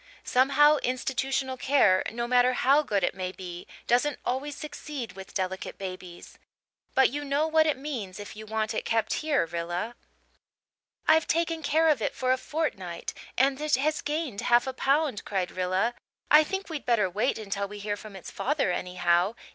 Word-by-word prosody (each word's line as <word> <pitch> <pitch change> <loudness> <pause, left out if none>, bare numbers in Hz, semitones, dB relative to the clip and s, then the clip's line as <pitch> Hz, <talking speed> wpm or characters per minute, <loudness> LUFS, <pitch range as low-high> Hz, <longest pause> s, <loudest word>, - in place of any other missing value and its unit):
Somehow, 280 +4 +5
institutional 260 +1 -1
care, 250 -9 +4
no 235 +1 -3
matter 250 +1 +4
how 270 +4 +4
good 205 -10 -1
it - - +1
may 185 -1 -4
be, 180 -1 -8 0.2
doesn't 250 +4 +2
always 275 +3 -2
succeed 295 -6 -6
with 195 0 -11
delicate 190 -1 -3
babies. 185 -2 -8 0.6
But 265 -2 +5
you 290 +2 -3
know 285 +2 +1
what 315 0 +4
it 300 - +1
means 240 -10 -5
if 205 - -8
you 215 0 -9
want 220 0 -1
it - - -2
kept 225 -1 0
here, 305 - +2
Rilla." 175 +6 -3 1.1
"I've 320 0 +5
taken 330 0 0
care 315 +2 +2
of 295 -7 +3
it - - -1
for 255 0 0
a 260 - +3
fortnight 190 - -3 0.2
and 270 +2 +2
it 305 0 +3
has 300 +4 0
gained 295 -8 -3
half 240 0 +4
a 265 - -3
pound," 275 -3 +1
cried 190 -3 -2
Rilla. 185 +5 0 0.4
"I 300 +1 +9
think 385 +5 -4
we'd 310 -6 -6
better 230 -5 +3
wait 210 +8 0
until 200 -2 -3
we 210 +1 -9
hear 205 0 -3
from 205 -1 -11
its 190 - -9
father 280 -8 0
anyhow. 180 +2 +1
245 Hz, 180 wpm, -27 LUFS, 195-290 Hz, 1.1 s, I